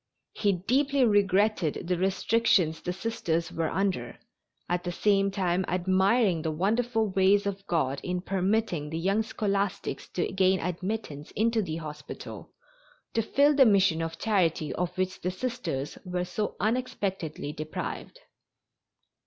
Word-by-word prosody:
He 205 Hz, -2 st, +1 dB
deeply 265 Hz, +9 st, +2 dB
regretted 200 Hz, -5 st, +2 dB
the 180 Hz, -, +1 dB
restrictions 190 Hz, -2 st, +2 dB
the 180 Hz, -, -2 dB
Sisters 175 Hz, -4 st, -2 dB
were 165 Hz, -1 st, -1 dB
under, 185 Hz, -12 st, -1 dB, 0.5 s
at 175 Hz, 0 st, -1 dB
the 175 Hz, -, -2 dB
same 195 Hz, +2 st, +2 dB
time 190 Hz, -2 st, 0 dB
admiring 190 Hz, +1 st, +2 dB
the 160 Hz, -, -1 dB
wonderful 220 Hz, +7 st, +1 dB
ways 195 Hz, +2 st, +4 dB
of 195 Hz, 0 st, -4 dB
God 140 Hz, -5 st, 0 dB
in 180 Hz, 0 st, -2 dB
permitting 190 Hz, -4 st, 0 dB
the 160 Hz, -, -3 dB
young 195 Hz, +6 st, +1 dB
scholastics 200 Hz, -3 st, -2 dB
to 175 Hz, -, +1 dB
gain 190 Hz, 0 st, +3 dB
admittance 180 Hz, -4 st, -4 dB
into 225 Hz, +1 st, +2 dB
the 160 Hz, -6 st, -3 dB
hospital, 150 Hz, -2 st, -8 dB, 0.6 s
to 225 Hz, -, +2 dB
fill 280 Hz, +6 st, +3 dB
the 280 Hz, -2 st, +6 dB
mission 190 Hz, -5 st, +4 dB
of 165 Hz, 0 st, -4 dB
charity 170 Hz, -, +1 dB
of 180 Hz, 0 st, -1 dB
which 185 Hz, 0 st, -2 dB
the 180 Hz, -, -1 dB
Sisters 185 Hz, -, -4 dB
were 180 Hz, -1 st, -2 dB
so 210 Hz, +3 st, -3 dB
unexpectedly 200 Hz, -, -2 dB
deprived. 155 Hz, -, -6 dB
190 Hz, 135 wpm, -28 LUFS, 170-215 Hz, 0.6 s, the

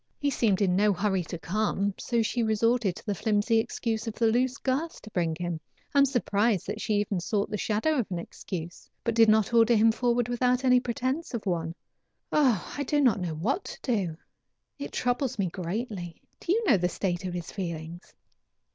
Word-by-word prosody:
He 285 Hz, -1 st, 0 dB
seemed 210 Hz, -6 st, +2 dB
in 180 Hz, -2 st, +2 dB
no 205 Hz, +1 st, +4 dB
hurry 190 Hz, 0 st, 0 dB
to 170 Hz, -, -5 dB
come, 200 Hz, +2 st, -1 dB
so 235 Hz, -2 st, 0 dB
she 235 Hz, +2 st, -1 dB
resorted 220 Hz, -2 st, +2 dB
to -, -, -12 dB
the 205 Hz, -, 0 dB
flimsy 215 Hz, +3 st, +2 dB
excuse 225 Hz, -1 st, -2 dB
of 220 Hz, -, -4 dB
the 235 Hz, -, +1 dB
loose 250 Hz, +2 st, +1 dB
girth 280 Hz, +5 st, -2 dB
to 215 Hz, -, -11 dB
bring 170 Hz, -4 st, 0 dB
him. 175 Hz, -1 st, -3 dB, 0.3 s
I 285 Hz, -, +4 dB
am 280 Hz, -, +7 dB
surprised 220 Hz, -6 st, +1 dB
that 210 Hz, +2 st, -4 dB
she 215 Hz, -, 0 dB
even 205 Hz, -2 st, 0 dB
sought 200 Hz, +4 st, -1 dB
the 210 Hz, -, -1 dB
shadow 230 Hz, +10 st, +1 dB
of 235 Hz, -, -2 dB
an 180 Hz, -, -3 dB
excuse, 170 Hz, 0 st, -7 dB
but 230 Hz, -, 0 dB
did 225 Hz, -1 st, +6 dB
not 215 Hz, +1 st, +3 dB
order 230 Hz, 0 st, +5 dB
him 225 Hz, +1 st, +5 dB
forward 240 Hz, 0 st, +1 dB
without 250 Hz, +1 st, +1 dB
any 250 Hz, -1 st, +6 dB
pretense 255 Hz, +4 st, -2 dB
of 220 Hz, -, -5 dB
one. 165 Hz, -3 st, -1 dB, 0.6 s
Oh! 255 Hz, -, +2 dB
I 285 Hz, -, -3 dB
don't 290 Hz, +1 st, +1 dB, 0.2 s
know 170 Hz, -3 st, -3 dB
what 235 Hz, -, -1 dB
to -, -, -8 dB
do. 195 Hz, -, -1 dB, 0.6 s
It 285 Hz, -, -5 dB
troubles 250 Hz, 0 st, -1 dB
me 195 Hz, -3 st, 0 dB
greatly. 185 Hz, -1 st, -4 dB, 0.2 s
Do 340 Hz, -, -2 dB
you 450 Hz, +4 st, +2 dB
know 240 Hz, -, +6 dB
the 180 Hz, 0 st, 0 dB
state 180 Hz, -1 st, -2 dB
of 180 Hz, -1 st, -3 dB
his 175 Hz, -2 st, -5 dB
feelings?" 170 Hz, -2 st, -6 dB
215 Hz, 200 wpm, -28 LUFS, 185-245 Hz, 0.6 s, am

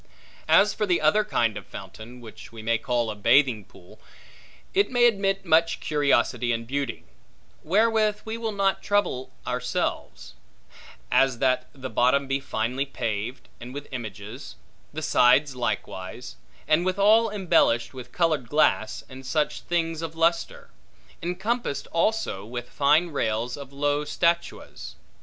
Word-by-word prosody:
As 210 Hz, +1 st, +5 dB
for 210 Hz, -, -2 dB
the 175 Hz, -2 st, +2 dB
other 215 Hz, +1 st, +3 dB
kind 115 Hz, -, 0 dB
of -, -, -9 dB
fountain, 120 Hz, +3 st, -10 dB
which 110 Hz, -2 st, -12 dB
we 115 Hz, -1 st, -10 dB
may 115 Hz, 0 st, +1 dB
call 120 Hz, -3 st, -1 dB
a -, -, -7 dB
bathing 120 Hz, +1 st, +3 dB
pool, 90 Hz, +2 st, -18 dB, 0.7 s
it 400 Hz, +2 st, +2 dB
may 245 Hz, -1 st, +3 dB
admit 195 Hz, -4 st, +1 dB
much 165 Hz, 0 st, +3 dB
curiosity 140 Hz, -5 st, +1 dB
and 115 Hz, 0 st, -2 dB
beauty; 140 Hz, 0 st, -3 dB, 0.6 s
wherewith 215 Hz, +3 st, +2 dB
we 220 Hz, 0 st, -4 dB
will 230 Hz, -1 st, -3 dB
not 195 Hz, -1 st, 0 dB
trouble 205 Hz, -11 st, 0 dB
ourselves: 125 Hz, 0 st, -3 dB, 0.8 s
as, 135 Hz, -2 st, +3 dB
that 130 Hz, 0 st, +1 dB
the 130 Hz, -2 st, -7 dB
bottom 130 Hz, +2 st, +2 dB
be 135 Hz, 0 st, 0 dB
finely 125 Hz, +1 st, -2 dB
paved, 120 Hz, -2 st, -4 dB
and 125 Hz, +2 st, -9 dB
with 145 Hz, 0 st, -7 dB
images; 110 Hz, -, -7 dB, 0.4 s
the 155 Hz, +1 st, -6 dB
sides 135 Hz, 0 st, +4 dB
likewise; 120 Hz, -2 st, -4 dB, 0.3 s
and 155 Hz, +3 st, +3 dB
withal 205 Hz, +5 st, +4 dB
embellished 180 Hz, -, +2 dB
with 125 Hz, -1 st, -10 dB
colored 155 Hz, -8 st, 0 dB
glass, 115 Hz, -7 st, +1 dB
and 130 Hz, 0 st, -11 dB
such 150 Hz, +3 st, -1 dB
things 165 Hz, -2 st, -1 dB
of 165 Hz, -1 st, -5 dB
lustre; 165 Hz, +1 st, 0 dB, 0.5 s
encompassed 180 Hz, -, -2 dB
also 170 Hz, -, 0 dB
with 120 Hz, +2 st, -7 dB
fine 150 Hz, +5 st, +3 dB
rails 115 Hz, -2 st, -1 dB
of 140 Hz, -2 st, -10 dB
low 145 Hz, +1 st, 0 dB
statuas. 170 Hz, +3 st, -2 dB
140 Hz, 140 wpm, -25 LUFS, 120-175 Hz, 0.8 s, As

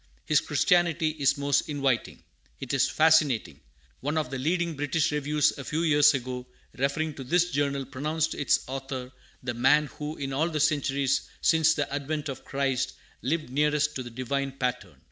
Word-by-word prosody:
His 150 Hz, -, +3 dB
Christianity 170 Hz, +1 st, +2 dB
is 140 Hz, -1 st, +3 dB
most 140 Hz, +1 st, +1 dB
inviting, 135 Hz, -5 st, -1 dB, 0.4 s
it 135 Hz, 0 st, -5 dB
is 135 Hz, -, +3 dB
fascinating! 145 Hz, -, +3 dB, 0.4 s
One 145 Hz, +4 st, -2 dB
of 150 Hz, -5 st, -1 dB
the 135 Hz, -, -3 dB
leading 170 Hz, +3 st, 0 dB
British 145 Hz, +2 st, 0 dB
reviews 150 Hz, 0 st, +1 dB
a -, -, -5 dB
few 155 Hz, +5 st, -2 dB
years 150 Hz, -2 st, +5 dB
ago, 125 Hz, -1 st, -5 dB, 0.3 s
referring 145 Hz, +4 st, -1 dB
to 135 Hz, -, -8 dB
this 175 Hz, +6 st, +2 dB
Journal, 140 Hz, -1 st, 0 dB
pronounced 155 Hz, +4 st, -2 dB
its 145 Hz, -, +1 dB
author 130 Hz, -1 st, -5 dB, 0.3 s
the 125 Hz, -1 st, -2 dB
man 135 Hz, +6 st, +4 dB
who, 150 Hz, +1 st, -4 dB
in 135 Hz, -1 st, -4 dB
all 155 Hz, +5 st, +1 dB
the 155 Hz, -2 st, -2 dB
centuries 140 Hz, -3 st, +1 dB
since 160 Hz, 0 st, +4 dB
the 145 Hz, -2 st, -2 dB
advent 145 Hz, +1 st, -3 dB
of 135 Hz, -1 st, -6 dB
Christ, 135 Hz, -1 st, -1 dB, 0.3 s
lived 150 Hz, 0 st, -2 dB
nearest 150 Hz, +1 st, +1 dB
to 130 Hz, -, -4 dB
the 120 Hz, -, -7 dB
Divine 135 Hz, +3 st, -3 dB
pattern. 125 Hz, -2 st, -3 dB
145 Hz, 170 wpm, -27 LUFS, 135-155 Hz, 0.4 s, years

